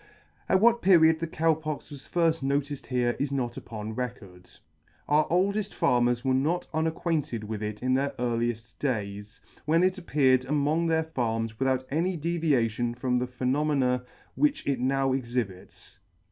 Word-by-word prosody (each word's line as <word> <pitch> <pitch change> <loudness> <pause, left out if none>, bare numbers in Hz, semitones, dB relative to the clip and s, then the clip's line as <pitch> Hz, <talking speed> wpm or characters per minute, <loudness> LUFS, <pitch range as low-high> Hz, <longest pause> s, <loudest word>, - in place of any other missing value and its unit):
At 190 - +4
what 235 +1 +5
period 160 -4 +5
the 165 - -2
Cow 160 0 +2
Pox 155 -1 -6
was 140 -2 -10
firll: 165 -2 +3
noticed 140 +1 -2
here 125 -1 0
is 140 0 -1
not 125 -3 -2
upon 110 -1 -6
record. 105 -7 -7 0.6
Our 150 +1 +3
oldeft 200 +4 0
farmers 120 0 +2
were 130 - +2
not 155 +7 +1
unacquainted 160 -6 -1
with 105 0 -5
it 105 +1 -5
in 130 0 +2
their 135 +2 +1
earlieft 120 -1 -2
days, 105 -5 -3 0.2
when 165 +3 +3
it 185 +1 +1
appeared 130 -7 +3
among 150 +3 +1
their 160 0 +2
farms 115 -7 -2
without 130 -1 +1
any 170 +5 0
deviation 135 -8 0
from 125 0 0
the 125 +1 -1
phenomena 130 0 0 0.3
which 295 -1 +1
it 135 -3 0
now 135 +1 +1
exhibits. 120 -7 -5
135 Hz, 155 wpm, -27 LUFS, 120-160 Hz, 0.6 s, what